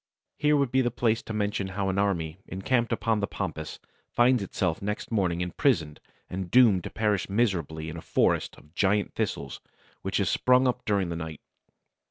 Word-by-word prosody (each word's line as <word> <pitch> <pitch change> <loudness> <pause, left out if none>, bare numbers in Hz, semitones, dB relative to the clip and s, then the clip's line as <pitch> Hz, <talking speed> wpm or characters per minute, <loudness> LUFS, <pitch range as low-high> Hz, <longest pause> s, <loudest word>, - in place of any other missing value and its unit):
Here 150 0 +4
would 140 -4 +1
be 130 - +3
the 120 - +1
place 115 -1 +1
to - - -8
mention 105 -2 -1
how 95 +1 -2
an 95 +1 0
army 85 -4 -1
encamped 115 +6 0
upon 115 -2 +1
the 100 - -1
Pampas 80 -6 -5 0.3
finds 120 0 +3
itself 90 -3 -2
next 105 +3 -4
morning 90 -6 +1
imprisoned 90 - 0 0.3
and 90 -1 -5
doomed 110 -7 +5
to - - -4
perish 105 -4 0
miserably 90 -8 0
in 80 +1 -6
a - - -7
forest - - +1
of 75 - -19
giant 100 +2 +1
thistles 70 -1 -3 0.4
which - - -1
has - - +1
sprung 125 +1 +4
up 125 0 -1
during 100 -4 +1
the 85 - -3
night. 80 -2 -6
100 Hz, 185 wpm, -27 LUFS, 85-115 Hz, 0.4 s, doomed